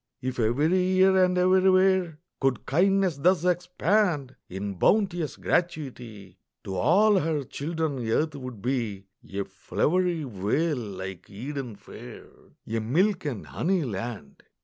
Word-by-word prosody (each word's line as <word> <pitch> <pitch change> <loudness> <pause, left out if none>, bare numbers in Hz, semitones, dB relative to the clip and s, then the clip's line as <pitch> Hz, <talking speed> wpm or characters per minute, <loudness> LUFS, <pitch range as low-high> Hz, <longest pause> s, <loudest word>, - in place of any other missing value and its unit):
If 130 0 -4
every 145 +11 +2
year 185 +1 +4
and 180 0 +2
everywhere 185 -2 +3 0.2
Could 135 -4 0
kindness 185 +1 +2
thus 180 +3 +2
expand 180 -4 +1
In 100 +2 -4
bounteous 175 - +1
gratuity, 120 - -3 0.2
To 95 -3 -5
all 190 - +4
her 155 -3 -1
children 155 0 -3
earth 155 +7 +1
would 125 -7 -8
be 115 -7 -2 0.3
A 100 0 -2
flowery 170 - 0
vale 130 - -1
like 95 -5 -7
Eden 125 +2 -6
fair, - - -11 0.4
A 115 +1 -2
milk 175 - +1
and 125 -8 -4
honey 180 0 0
land. 115 - -6
150 Hz, 125 wpm, -26 LUFS, 115-180 Hz, 0.4 s, year